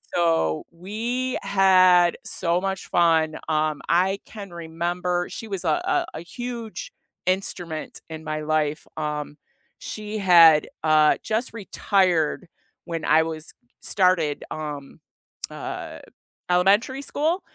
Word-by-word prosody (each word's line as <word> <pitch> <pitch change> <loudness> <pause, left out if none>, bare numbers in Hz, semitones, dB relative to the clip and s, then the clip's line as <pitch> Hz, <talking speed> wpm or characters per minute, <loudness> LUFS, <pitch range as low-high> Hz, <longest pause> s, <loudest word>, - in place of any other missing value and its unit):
so 165 - +1
we 230 +9 -3
had 185 -3 +5
so 170 -1 0
much 190 0 -3
fun. 160 -2 +2
Um, 155 -2 0
I 185 +4 +2
can 200 -2 -9
remember 175 +1 -2
She 225 - -7
was 195 -4 -3
a 160 -3 +1
a - - +1
a - - -8
huge 235 +4 -6 0.4
instrument 175 -4 -2
in 160 -1 -7
my 155 -1 -3
life. 155 0 -1
Um, 150 -1 -4 0.4
she 215 0 -6
had, 170 -6 +7 0.2
uh, 155 -1 +5
just 225 +3 -2
retired 185 -5 +1 0.4
when 165 -2 -4
I 160 - +5
was 160 -1 -6 0.3
started, 180 -6 +1
um, 145 -3 -6 0.5
uh, - - -6 0.5
elementary 200 +9 +3
school, 315 +6 -1
175 Hz, 115 wpm, -24 LUFS, 155-195 Hz, 0.5 s, had